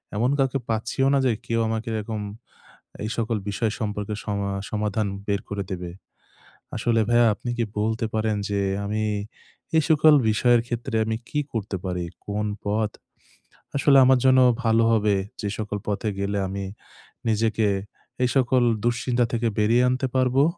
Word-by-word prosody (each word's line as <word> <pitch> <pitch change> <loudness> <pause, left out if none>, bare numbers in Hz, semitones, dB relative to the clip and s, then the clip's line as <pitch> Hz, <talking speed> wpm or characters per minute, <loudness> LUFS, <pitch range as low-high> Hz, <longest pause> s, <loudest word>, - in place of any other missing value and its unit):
এমন 120 +5 +2
কাউকে 135 0 +1
পাচ্ছিও 115 +4 0
না - - +4
যে 125 - +4
কেউ 115 0 0
আমাকে 110 +1 -3
এরকম, 110 0 -3 0.8
এই 110 - -3
সকল 115 0 0
বিষয় 110 +2 0
সম্পর্কে 105 -1 -3
সমা 100 -1 -2 0.2
সমাধান 105 0 -1 0.2
বের 100 0 +1
করে 100 -1 -2
দেবে। 90 -1 -5 0.9
আসলে 115 -1 +1
ভাইয়া 120 0 +5
আপনি 120 - -6
কি 120 - +1 0.2
বলতে 110 +1 0
পারেন 110 -1 0
যে 100 0 0 0.3
আমি, 105 +1 -1 0.7
এই 160 - +4
সকল 155 0 +6 0.2
বিষয়ের 120 +2 +4
ক্ষেত্রে 120 -1 -3
আমি 110 0 -1
কি 150 - -1
করতে 105 -3 -3
পারি? 90 -1 -2 0.2
কোন 105 +1 -1 0.2
পথ 105 +1 0 0.8
আসলে 140 0 +5
আমার 130 0 +5
জন্য 130 0 +6 0.2
ভালো 115 0 +3
হবে? 105 -2 +3 0.3
যে 105 - -2
সকল 105 -1 -3
পথে 105 +1 -1
গেলে 100 +1 -1
আমি 100 +1 -4 0.6
নিজেকে, 110 0 +2 0.6
এই 125 - +3
সকল 130 0 +3 0.2
দুশ্চিন্তা 120 +1 +1
থেকে 115 0 +1
বেরিয়ে 115 +4 +4
আনতে 130 +1 0
পারবো? 130 +1 +3
110 Hz, 155 wpm, -24 LUFS, 105-120 Hz, 0.9 s, সকল